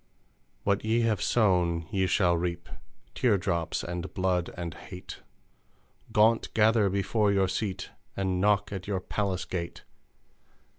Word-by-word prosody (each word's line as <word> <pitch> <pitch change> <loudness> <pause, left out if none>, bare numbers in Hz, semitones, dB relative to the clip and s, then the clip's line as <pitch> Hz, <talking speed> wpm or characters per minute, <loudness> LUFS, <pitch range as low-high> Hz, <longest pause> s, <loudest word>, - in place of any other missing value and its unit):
What 100 0 +1
ye 115 +2 +2
have 110 -4 +1
sown 90 -7 +2
ye 95 -3 +1
shall 90 -1 +3
reap: 85 0 -3 0.5
Teardrops, 90 -7 0
and 85 +1 -5
Blood, 90 -2 +1
and 85 -2 -4
Hate, 90 -2 -10 0.9
Gaunt 110 +2 +3
gather 110 -2 +4
before 100 +2 +1
your 95 -1 +3
Seat 95 0 -3 0.3
And 95 -2 0
knock 105 0 +2
at 95 -1 -6
your 100 -2 -1
palace 95 -1 -2
gate! 85 -2 -5
95 Hz, 130 wpm, -28 LUFS, 90-105 Hz, 0.9 s, gather